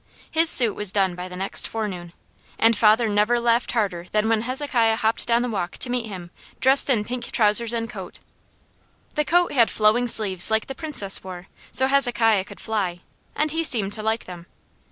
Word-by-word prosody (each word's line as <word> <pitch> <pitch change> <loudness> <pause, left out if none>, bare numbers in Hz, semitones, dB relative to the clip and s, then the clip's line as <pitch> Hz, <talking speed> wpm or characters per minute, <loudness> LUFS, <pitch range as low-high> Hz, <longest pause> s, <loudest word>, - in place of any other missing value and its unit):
His 325 +1 +2
suit 235 -9 +6
was 210 -2 0
done 195 -3 0
by 180 +1 -7
the 180 - -10
next 190 +2 -1
forenoon, 185 -6 -6 0.4
and 225 +1 +3
father 220 +2 +3
never 210 +3 +1
laughed 235 0 0
harder 190 -7 -2
than 215 +1 0
when 225 -1 +1
Hezekiah 250 -2 -1
hopped 220 +1 -1
down 235 0 +1
the - - -2
walk 190 -5 -4
to 245 - +1
meet 245 -2 -3
him 180 -4 -9 0.3
dressed 270 +2 +4
in 220 -5 +1
pink 245 0 -6
trousers 220 +1 +2
and 230 -1 -3
coat. 195 -6 -10 0.9
The 300 - 0
coat 350 +3 +1
had 235 -4 +3
flowing 220 +3 +1
sleeves 195 -6 +2
like 220 0 0
the 270 - -7
Princess 265 -11 -1
wore, 185 -1 -10 0.2
so 260 - +4
Hezekiah 235 -7 +1
could - - -13
fly, 190 -6 -3 0.3
and 305 0 -1
he 325 +1 -2
seemed 210 -9 +2
to 215 - -4
like 220 +1 -2
them. 175 -1 -11
220 Hz, 195 wpm, -22 LUFS, 195-245 Hz, 0.9 s, suit